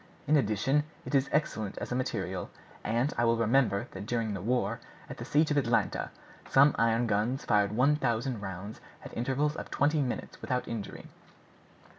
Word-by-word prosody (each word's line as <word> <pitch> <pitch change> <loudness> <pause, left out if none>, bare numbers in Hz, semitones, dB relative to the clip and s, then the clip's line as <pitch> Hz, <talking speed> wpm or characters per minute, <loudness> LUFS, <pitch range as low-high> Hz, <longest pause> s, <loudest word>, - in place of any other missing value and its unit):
In 150 - +3
addition, 135 +4 +2 0.2
it - - -6
is 135 0 +3
excellent 110 -9 -1
as - - -5
a - - 0
material, 130 0 -2 0.3
and 120 +5 0
I 120 - +3
well 115 0 +3
remember 115 -3 +2
that 95 +2 -7
during 115 -3 -1
the 95 - -4
war, 125 +5 0 0.3
at - - -8
the - - -6
siege 150 +1 +2
of 145 - +2
Atlanta, 120 -4 +1 0.4
some 140 +2 +6
iron 115 +1 +3
guns 115 +5 0
fired 105 -3 +3
one 140 +6 +3
thousand 120 -3 -1
rounds 95 +2 -7 0.2
at - - -9
intervals 135 +5 0
of - - -6
twenty 150 +2 +2
minutes 125 -3 -4
without 125 0 -2
injury." 110 -4 -6
120 Hz, 175 wpm, -30 LUFS, 110-140 Hz, 0.4 s, some